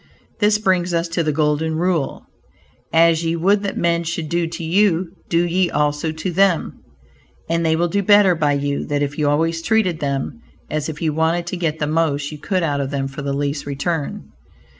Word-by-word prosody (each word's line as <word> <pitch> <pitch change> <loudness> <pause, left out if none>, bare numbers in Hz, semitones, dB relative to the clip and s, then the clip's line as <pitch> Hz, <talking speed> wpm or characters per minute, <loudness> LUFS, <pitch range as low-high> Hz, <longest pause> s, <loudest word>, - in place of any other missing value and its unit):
This 210 0 +4
brings 185 -4 +1
us 170 +1 0
to 170 +1 0
the 155 -2 0
golden 155 +1 0
rule, 170 -3 -1 0.7
"As 165 0 +4
ye 165 0 0
would 195 +5 +2
that 200 -1 -3
men 170 0 +1
should 165 -1 -4
do 170 -1 0
to 165 +1 -6
you, 180 0 +2 0.2
do 170 +1 +2
ye 175 +1 +1
also 150 +1 0
to 160 +3 -4
them" 185 -1 +1 0.7
and 165 0 0
they 160 -1 +2
will 170 +2 +1
do 200 +4 0
better 205 -1 +5
by 150 -3 +1
you 140 0 -1
than 145 -1 -1
if 145 +2 -4
you 150 -1 +2
always 165 +3 +1
treated 185 -4 +1
them 140 - -3 0.3
as 155 0 -2
if 155 +1 -6
you 155 -2 +1
wanted 165 +2 +1
to 175 - -4
get 165 -3 -1
the 150 - -1
most 150 -2 0
you 150 - -8
could 185 +3 -1
out 145 -3 0
of 135 - -3
them 135 -1 -2
for 140 +2 -7
the 140 -1 -2
least 145 +1 -2
return. 145 +2 -3
165 Hz, 205 wpm, -20 LUFS, 150-175 Hz, 0.7 s, better